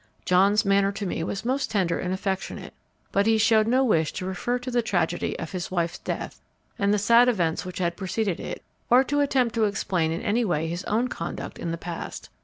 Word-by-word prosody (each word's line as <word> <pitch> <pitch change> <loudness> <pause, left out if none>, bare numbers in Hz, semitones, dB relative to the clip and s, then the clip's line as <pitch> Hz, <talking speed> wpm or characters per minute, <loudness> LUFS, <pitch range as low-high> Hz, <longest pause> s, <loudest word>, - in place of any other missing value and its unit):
John's 200 +4 +4
manner 195 0 +3
to 200 +1 -4
me 170 -3 -2
was 195 +5 -4
most 265 +3 0
tender 185 -5 0
and 180 - -2
affectionate; 190 0 -3 0.4
but 200 +2 +2
he 225 0 +4
showed 220 0 +4
no 255 +3 +3
wish 165 - +2
to 185 - -4
refer 190 +7 -1
to 250 +1 -6
the 240 0 +2
tragedy 175 -5 -1
of 165 - -6
his 185 0 -4
wife's 170 -2 -1
death - - -5 0.4
and 200 0 +2
the 210 - +3
sad 235 +4 +5
events 175 -9 0
which 180 -1 -7
had 170 -2 -1
preceded 195 -1 -2
it, - - -6 0.3
or 250 +2 +6
to 290 +2 -1
attempt 260 -5 +2
to 225 -2 +2
explain 180 -5 0
in 165 - -3
any 230 +4 +1
way 165 -6 0
his 170 +3 -4
own 230 +4 +1
conduct 170 -8 -6
in 170 - -3
the 165 - -2
past. 170 0 -7
200 Hz, 215 wpm, -25 LUFS, 175-230 Hz, 0.4 s, or